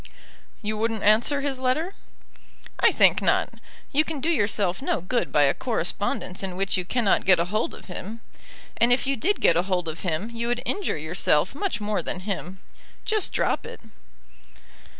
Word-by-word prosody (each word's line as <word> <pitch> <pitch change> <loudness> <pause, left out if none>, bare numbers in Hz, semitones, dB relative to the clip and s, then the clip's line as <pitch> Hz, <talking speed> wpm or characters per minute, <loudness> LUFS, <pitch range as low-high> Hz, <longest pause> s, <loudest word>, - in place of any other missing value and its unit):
"You 215 0 -2
wouldn't 225 -1 -1
answer 230 +7 +3
his 275 -2 -2
letter." 305 +9 0 0.9
"I - - +5
think - - +4
not. - - +2 0.4
You 295 +2 +3
can 315 -2 -5
do 315 +5 0
yourself 205 - +1
no 275 - 0
good 230 +8 -2
by 145 - +4
a 140 - +4
correspondence 205 -4 -2
in 190 -2 -4
which 195 +1 +1
you 185 - -1
cannot 230 0 +1
get 185 -2 +5
a 170 - +2
hold 215 +5 -2
of - - -14
him. 205 +5 -7 0.6
And 235 +1 +3
if 245 - +3
you 275 +1 +1
did 385 - 0
get 165 - +4
a - - +4
hold 180 -2 -2
of 160 0 -5
him 180 +5 -3
you 235 0 -3
would 240 +1 -1
injure 400 - -1
yourself 155 +1 +1
much 390 - -2
more 210 0 -1
than 180 - -4
him. 190 -1 -5 0.4
Just 430 -3 +1
drop - - 0
it." - - -9
215 Hz, 185 wpm, -25 LUFS, 185-255 Hz, 0.9 s, I